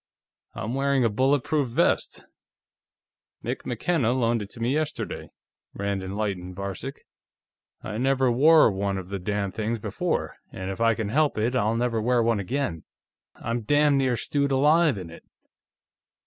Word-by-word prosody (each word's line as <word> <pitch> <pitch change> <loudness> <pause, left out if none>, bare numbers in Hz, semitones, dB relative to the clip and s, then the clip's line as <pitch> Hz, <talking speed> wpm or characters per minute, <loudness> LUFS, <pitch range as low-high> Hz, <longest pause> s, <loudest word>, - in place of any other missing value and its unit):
"I'm 110 +3 -4
wearing 135 -1 +2
a - - +3
bulletproof 135 +5 +1
vest; 120 - 0 1.2
Mick - - -4
McKenna 125 0 +1
loaned 120 -3 +1
it 100 - -7
to 115 - -12
me 120 +3 0
yesterday," 155 0 -3 0.5
Rand 100 -1 -2
enlightened 95 -2 -4
Varcek. 100 -1 -6 0.8
"I 105 - -4
never 130 0 +2
wore 150 +1 +6
one 100 0 -2
of 95 -1 -7
the 100 0 -3
damn 100 +1 -2
things 110 +3 -2
before, - - -2
and 95 +1 -5
if 95 - -6
I 115 -1 +4
can 110 -3 -3
help 150 +3 +2
it, 115 +4 0
I'll 115 -3 +1
never 115 -1 0
wear 120 +1 +2
one 115 -2 +2
again. 100 - -2 0.5
I'm 115 +1 -3
damn 145 +5 +3
near 130 -3 +1
stewed 140 +2 0
alive 150 0 +4
in 90 -3 -7
it." 85 - -12
115 Hz, 155 wpm, -25 LUFS, 100-135 Hz, 1.2 s, wore